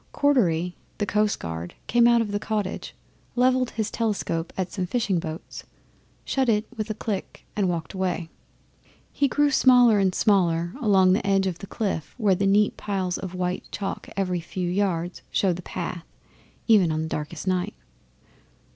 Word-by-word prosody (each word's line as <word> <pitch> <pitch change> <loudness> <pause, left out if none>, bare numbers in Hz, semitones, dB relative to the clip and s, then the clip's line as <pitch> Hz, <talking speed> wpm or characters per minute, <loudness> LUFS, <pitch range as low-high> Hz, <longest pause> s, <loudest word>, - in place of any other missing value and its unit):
Cordery, 180 - +2 0.2
the 205 - 0
coastguard, 90 - -1
came 235 0 +4
out 235 -1 +5
of 215 -3 -2
the 205 - -1
cottage, 210 -3 -3 0.4
levelled 255 0 +3
his 220 -2 -3
telescope 200 -7 -1
at 185 -1 -2
some 185 -3 -3
fishing 200 -4 0
boats, 160 -1 -7 0.6
shut 265 -2 +1
it 210 0 +2
with 215 -1 -4
a 215 - -2
click 210 -3 -5
and 200 -3 +1
walked 165 -4 -3
away. 180 -3 -2 0.8
He 280 - +2
grew 290 +2 +2
smaller 245 -5 +6
and 190 -2 +2
smaller 175 -4 +2
along 190 -5 +5
the 195 +1 0
edge 195 -1 +3
of 180 -3 -2
the 195 - -8
cliff, 195 -7 -3
where 210 -5 +3
neat 200 +2 +2
piles 190 -3 -2
of 190 -1 -6
white 180 0 -2
chalk 195 -1 -4
every 185 -2 0
few 175 +2 -4
yards 180 -2 -1
show 190 -3 +2
the 175 - -6
path 175 -1 -5 0.6
even 200 -8 +5
on 155 0 -1
the - - -3
darkest 150 +2 -5
night. 185 +2 -1
195 Hz, 165 wpm, -25 LUFS, 175-215 Hz, 0.8 s, smaller